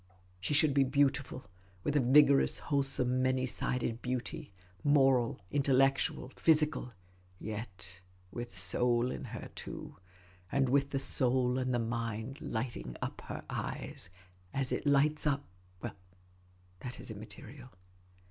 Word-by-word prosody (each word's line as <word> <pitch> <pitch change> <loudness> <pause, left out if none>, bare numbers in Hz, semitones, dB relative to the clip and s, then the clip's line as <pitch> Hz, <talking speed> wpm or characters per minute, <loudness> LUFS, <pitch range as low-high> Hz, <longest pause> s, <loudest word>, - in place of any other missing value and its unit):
She 100 +11 0
should 150 -1 +6
be 140 0 +5
beautiful, 135 -1 +1 0.4
with 145 - 0
a - - +5
vigorous, 140 +2 +5
wholesome, 135 -3 0
many 130 0 +2
sided 120 -2 -1
beauty, 125 -4 -3 0.3
moral, 135 -6 +4
intellectual, 135 -1 +2
physical; 155 -5 +2 0.4
yet 105 -4 -7 0.3
with 120 +3 -5
soul 120 +7 +1
in - - -5
her, - - -7
too; - - -7 0.5
and 135 -2 +2
with 140 +1 +3
the 140 - -1
soul 130 -1 +2
and 130 0 0
the 120 - +2
mind 115 +3 -3
lighting 110 - -4
up - - -4
her - - -6
eyes, - - -4 0.5
as 135 -1 0
it - - -1
lights 150 +2 +3
up 140 -1 +1 0.2
— 90 0 -30
well, - - -3 0.9
that 125 +6 -7
is - - -6
immaterial. 115 +5 -10
130 Hz, 130 wpm, -33 LUFS, 120-140 Hz, 0.9 s, should